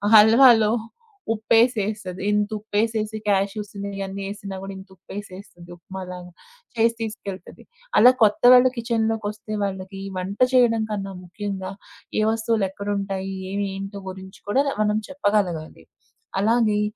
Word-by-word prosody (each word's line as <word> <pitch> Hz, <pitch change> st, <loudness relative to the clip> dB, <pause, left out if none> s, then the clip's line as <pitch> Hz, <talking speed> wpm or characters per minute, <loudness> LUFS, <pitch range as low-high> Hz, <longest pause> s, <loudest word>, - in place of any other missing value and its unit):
హల్వాలో 220 Hz, 0 st, +7 dB, 0.6 s
ఉప్పేసేస్తది 215 Hz, -4 st, +1 dB
ఇంత 210 Hz, 0 st, +1 dB
ఉపేసేసి, 220 Hz, 0 st, -1 dB
కాష్యూస్ 200 Hz, +1 st, 0 dB
ఇయన్నీ 195 Hz, -1 st, -5 dB
ఏసినా 200 Hz, -1 st, -7 dB
కూడా 195 Hz, 0 st, -6 dB
ఇంత 190 Hz, 0 st, -12 dB
ఉపేసేస్తుంది 185 Hz, -2 st, -10 dB
ఉప్మా 190 Hz, +2 st, -9 dB
లాగా 180 Hz, 0 st, -9 dB, 0.4 s
చేసి 230 Hz, 0 st, +3 dB
తీసుకెళ్తాది. 200 Hz, -4 st, -7 dB, 0.3 s
అలా 250 Hz, +1 st, +8 dB
కొత్తవళు 250 Hz, +4 st, +6 dB
కిచెన్‌లోకొస్తే 220 Hz, -2 st, -2 dB
వాళ్ళకి 195 Hz, 0 st, -5 dB, 0.2 s
వంట 195 Hz, +3 st, -5 dB
చేయడం 230 Hz, -3 st, +4 dB
కన్నా 195 Hz, -2 st, -3 dB
ముఖ్యంగా 190 Hz, 0 st, -5 dB, 0.5 s
ఏ -, -, +3 dB
వస్తువులేక్కడుంటాయి, 200 Hz, -3 st, -2 dB, 0.4 s
ఏంటో 195 Hz, +1 st, -6 dB
గురించి 190 Hz, +1 st, -10 dB
కూడా 270 Hz, +6 st, +3 dB, 0.2 s
మనం 210 Hz, +1 st, +1 dB
చెప్పగలగాలి. 190 Hz, -, -1 dB, 0.6 s
అలాగే 215 Hz, -1 st, +2 dB
205 Hz, 105 wpm, -23 LUFS, 195-220 Hz, 0.6 s, అలా